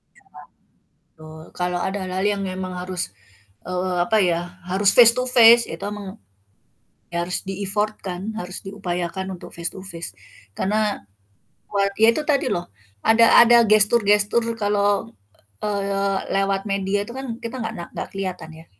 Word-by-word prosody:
Iya. - - -24 0.9
Betul, 155 0 -12
kalau 180 0 -2
ada 190 +3 -2
hal-hal 185 +1 -3
yang 200 - -4
memang 185 0 -5
harus, 180 -1 -4 0.7
eee, 180 0 -2
apa 220 +1 +1
ya 175 -4 +2 0.3
harus 190 +2 +4
face 235 -2 +10
to 250 - -1
face, 235 0 +8
itu 165 - -7
memang, 210 -1 -7 1.0
ya 170 0 -1
harus 180 +1 -2
di-effort-kan, 195 -1 -3 0.2
harus 180 -1 -7
diupayakan 190 -2 -4
untuk - - -11
face 170 0 -2
to - - -9
face, 170 - -6 0.5
karena 210 - -1 0.7
buat 200 -1 0
ya 220 +1 +5
itu 310 - -2
tadi 280 -2 +1
loh, 175 0 -4 0.4
ada 225 +1 +5 0.2
ada 240 0 +6
gestur-gestur 210 +1 +4
kalau, 205 - 0 0.5
eee, 200 -1 -1 0.2
lewat 195 0 +1
media 195 +1 -1
itu 235 - -10
kan 265 -4 -5
kita 230 +2 -5
nggak 225 0 -4
na 170 - -5
nggak - - -5
kelihatan 185 -4 -5
ya. - - -28
195 Hz, 150 wpm, -22 LUFS, 180-210 Hz, 1.0 s, face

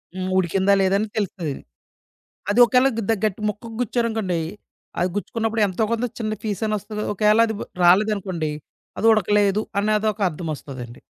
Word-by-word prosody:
హ్మ్. 185 0 -3
ఉడికిందా? 190 +2 +2
లేదా? 190 +1 +2
అని 215 - -1
తెలుత్తది. 180 -7 -2 1.0
అది 215 +4 +2
ఒకేళ 250 +2 +4
గ - - 0
ద - - +5
గట్టి 210 0 -2
ముక్కకి 225 +2 -7
గుచ్చారనుకోండి. 220 -6 -1 0.6
అది 180 +1 +1
గుచ్చుకున్నప్పుడు 225 +3 -2
ఎంతో 190 +4 -1
కొంత 230 +1 0
చిన్న 215 -1 -2
పీస్ 210 0 -3
అన్నా 215 -1 0
వస్తది 210 +2 -9
కదా! - - -3
ఒకేళ 210 +2 +4
అది 220 - -3 0.3
రాలేదనుకోండి. 185 -4 +2 0.5
అది 225 - -1
ఉడకలేదు 210 -1 +2 0.2
అనేదొక 215 +1 +1
అర్థమొస్తదండి. 140 -7 -7
210 Hz, 150 wpm, -22 LUFS, 185-220 Hz, 1.0 s, ద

